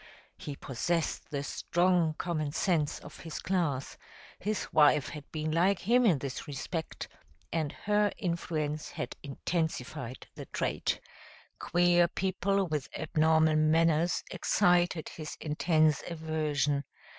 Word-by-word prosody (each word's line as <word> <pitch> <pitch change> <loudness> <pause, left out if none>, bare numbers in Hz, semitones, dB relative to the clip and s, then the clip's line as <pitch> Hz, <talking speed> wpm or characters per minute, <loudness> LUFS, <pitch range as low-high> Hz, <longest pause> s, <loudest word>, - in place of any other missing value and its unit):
He 145 - -7
possessed 160 +5 -2
the 140 -3 -3
strong 175 0 +1
common 155 -4 -2
sense 160 -6 +1
of - - -12
his 165 -2 -6
class; 165 -8 -1 0.4
his 210 +1 -3
wife 150 -2 +5
had 150 -3 -9
been 155 0 -2
like 180 +5 +3
him 240 +6 +3
in 175 -8 +4
this 135 +3 -5
respect, 155 +3 -4 0.5
and 155 -3 0
her 210 0 +1
influence 155 -3 -2
had 125 - -5
intensified 140 -3 -3
the - - -9
trait. - - -1 0.6
Queer 175 0 +4
people 195 +2 0
with 150 -5 -3
abnormal 160 -1 +3
manners 165 +2 +3
excited 175 -2 +2
his 155 -2 -7
intense 155 0 +2
aversion. 155 -3 0
160 Hz, 120 wpm, -30 LUFS, 150-175 Hz, 0.6 s, wife